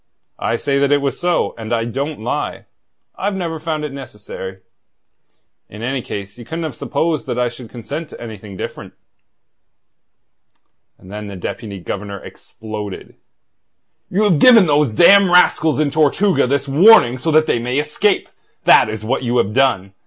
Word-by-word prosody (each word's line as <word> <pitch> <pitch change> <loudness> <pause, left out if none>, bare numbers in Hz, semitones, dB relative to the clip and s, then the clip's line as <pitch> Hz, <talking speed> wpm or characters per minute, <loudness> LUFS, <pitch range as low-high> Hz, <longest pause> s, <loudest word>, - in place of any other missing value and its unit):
I - - -1
say 140 +3 0
that 140 0 +1
it 145 - +5
was 140 -1 -3
so; 175 0 0
and 110 0 -7
I 115 -1 0
don't 140 +4 -4
lie. - - -3 0.5
I've 200 +1 -2
never 165 -4 -4
found 155 -1 -3
it 145 - -6
necessary. 105 -7 -9 1.1
In 105 +2 -10
any 130 +2 -2
case 100 0 -7
ye - - -9
couldn't 165 +6 -5
have 155 -4 -4
supposed 160 +5 -2
that - - -3
I 125 -1 +1
should 120 -1 -12
consent 140 +7 -7
to - - -12
anything 105 -4 -9
different." - - -7 2.0
And 95 - -15
then 105 0 -7
the 100 - -8
Deputy 100 +2 -6
Governor 100 +3 -6
exploded. 105 -3 -9 1.0
"You 200 +4 +1
have 185 -8 +3
given 230 -3 +7
those 150 -3 +2
damned 190 - +6
rascals 160 -3 +3
in 150 -2 +1
Tortuga 155 +3 +2
this 140 +1 -1
warning 145 - +6
so 165 - -2
that 155 0 +4
they 120 - 0
may 125 +3 -2
escape! 150 +8 0 0.4
That - - +6
is 110 0 -6
what 130 +4 -1
you 125 -1 -1
have 105 -1 +1
done. 110 -7 +1
135 Hz, 165 wpm, -18 LUFS, 110-160 Hz, 2.0 s, given